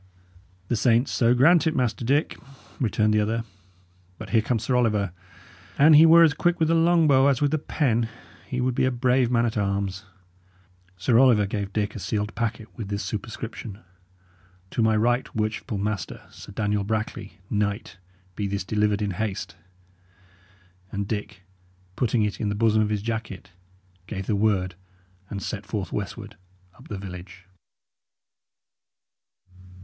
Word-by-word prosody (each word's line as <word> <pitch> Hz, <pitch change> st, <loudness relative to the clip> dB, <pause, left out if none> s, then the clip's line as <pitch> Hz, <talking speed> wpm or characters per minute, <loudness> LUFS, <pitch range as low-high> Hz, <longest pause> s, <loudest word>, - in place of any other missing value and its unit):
"The 120 Hz, -, 0 dB
saints 120 Hz, +2 st, +2 dB
so 120 Hz, 0 st, +3 dB
grant 160 Hz, +6 st, +5 dB
it, 160 Hz, -, 0 dB
Master 125 Hz, -2 st, 0 dB
Dick!" 140 Hz, +6 st, +1 dB, 0.4 s
returned 110 Hz, -3 st, +1 dB
the 105 Hz, -, +3 dB
other. 110 Hz, +2 st, 0 dB, 0.7 s
"But -, -, -9 dB
here 115 Hz, -, +4 dB
comes 115 Hz, 0 st, -1 dB
Sir 125 Hz, +3 st, 0 dB
Oliver. 105 Hz, -6 st, +1 dB, 0.7 s
An 155 Hz, +3 st, +7 dB
he 155 Hz, +2 st, +8 dB
were 165 Hz, +1 st, +8 dB
as 160 Hz, -3 st, +4 dB
quick 175 Hz, +3 st, +1 dB
with 160 Hz, -1 st, +2 dB
the -, -, +3 dB
long 165 Hz, 0 st, +4 dB
bow 135 Hz, -1 st, +5 dB
as 135 Hz, -3 st, +2 dB
with 145 Hz, -1 st, +1 dB
the 155 Hz, -, +1 dB
pen, 120 Hz, -7 st, 0 dB, 0.4 s
he 130 Hz, -2 st, -3 dB
would 125 Hz, 0 st, +1 dB
be 125 Hz, -, +1 dB
a -, -, +3 dB
brave 125 Hz, 0 st, +2 dB
man 120 Hz, -1 st, +2 dB
at 115 Hz, -1 st, -2 dB
arms." 100 Hz, 0 st, -2 dB, 0.9 s
Sir 115 Hz, +5 st, +3 dB
Oliver 120 Hz, -6 st, +5 dB
gave 100 Hz, -1 st, -4 dB
Dick 105 Hz, 0 st, -1 dB
a -, -, -5 dB
sealed 105 Hz, +2 st, -2 dB
packet, 110 Hz, -1 st, -3 dB
with 110 Hz, -4 st, -6 dB
this 100 Hz, 0 st, -3 dB
superscription: 110 Hz, -1 st, -6 dB, 0.9 s
"To -, -, -1 dB
my 110 Hz, -1 st, +3 dB
ryght 120 Hz, +3 st, 0 dB
worchypful 110 Hz, 0 st, -2 dB
master, 105 Hz, -2 st, -3 dB
Sir -, -, -12 dB
Daniel 105 Hz, -1 st, -1 dB
Brackley, 110 Hz, -2 st, -4 dB
knyght, 105 Hz, 0 st, -2 dB, 0.4 s
be 100 Hz, +1 st, -2 dB
thys 100 Hz, -1 st, -3 dB
delyvered 105 Hz, 0 st, +1 dB
in 100 Hz, -, -1 dB
haste." 95 Hz, -3 st, -4 dB, 1.4 s
And 100 Hz, -1 st, -3 dB
Dick, 105 Hz, -2 st, -5 dB, 0.5 s
putting 120 Hz, -2 st, +1 dB
it 105 Hz, -1 st, -2 dB
in 105 Hz, -, 0 dB
the 105 Hz, -, -2 dB
bosom 110 Hz, 0 st, +3 dB
of 105 Hz, -, +1 dB
his 105 Hz, -2 st, -2 dB
jacket, 110 Hz, -5 st, -5 dB, 0.6 s
gave 95 Hz, -2 st, -5 dB
the 105 Hz, -, 0 dB
word 100 Hz, -3 st, +1 dB, 0.6 s
and 100 Hz, -3 st, -5 dB
set -, -, -4 dB
forth -, -, -4 dB
westward -, -, -5 dB, 0.4 s
up -, -, -17 dB
the 105 Hz, -, -5 dB
village. 90 Hz, -1 st, -9 dB
110 Hz, 160 wpm, -25 LUFS, 100-125 Hz, 1.4 s, he